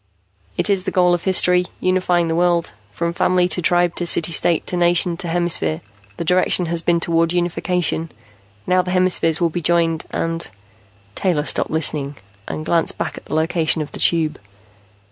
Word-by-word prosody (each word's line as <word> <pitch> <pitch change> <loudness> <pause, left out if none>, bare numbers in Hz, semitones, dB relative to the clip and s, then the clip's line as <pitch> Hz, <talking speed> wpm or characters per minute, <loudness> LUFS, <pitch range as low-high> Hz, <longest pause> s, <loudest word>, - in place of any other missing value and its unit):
"It - - +1
is 195 -2 0
the - - -1
goal 180 -2 +2
of 175 - -2
history, 180 -1 +2
unifying 180 -2 +1
the 165 - -1
world. 175 -1 +1 0.2
From 170 +9 -3
family 180 0 +1
to 180 - 0
tribe 175 0 +2
to 175 - -2
city 170 0 +1
state 165 +1 +1
to - - -4
nation 175 0 +1
to 180 - -4
hemisphere, 165 - 0 0.4
the 170 - -4
direction 180 +1 +2
has 170 0 -2
been 170 0 +1
toward 165 0 +1
unification. 175 -2 -1 0.5
Now 185 0 +2
the 180 - -7
hemispheres 180 -3 +2
will 170 -2 +1
be 175 - -4
joined 165 -1 +1
and 165 0 -3 0.3
" 100 0 -33
Taylor 165 - -1
stopped - - +1
listening 145 -3 +1 0.3
and 155 - -5
glanced 165 0 0
back - - -4
at - - -12
the 155 - -5
location 160 -1 +1
of 145 - -11
the - - -9
Tube. 160 -3 +2
170 Hz, 185 wpm, -19 LUFS, 160-180 Hz, 0.5 s, goal